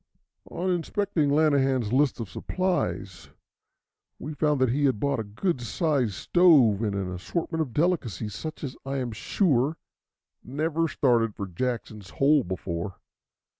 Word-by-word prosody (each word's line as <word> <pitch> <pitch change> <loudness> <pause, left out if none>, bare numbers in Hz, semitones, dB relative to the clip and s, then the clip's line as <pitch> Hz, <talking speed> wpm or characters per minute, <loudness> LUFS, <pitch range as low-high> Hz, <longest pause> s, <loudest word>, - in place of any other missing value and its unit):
On 185 +2 -2
inspecting 175 -2 0
Lanahan's 135 -6 +2
list 135 -1 +2
of 115 - -4
supplies, 95 - -2 0.9
we 155 - -6
found 150 -1 +1
that 130 -2 +3
he 145 +3 +1
had 130 -7 +1
bought 140 0 0
a - - -1
good 125 - -2
sized 130 - 0
stove 140 - +5
and 105 -3 -1
an 95 -2 -3
assortment 160 - -3
of 145 -6 -2
delicacies 115 - -1
such 155 -1 -6
as 135 -3 -4
I 135 +1 -3
am 125 -3 -2
sure 145 - +1 0.7
never 160 +5 -1
started 120 -7 +1
for 100 - -4
Jackson's 105 0 -4
Hole 140 - +3
before. 90 0 -4
135 Hz, 140 wpm, -26 LUFS, 110-155 Hz, 0.9 s, stove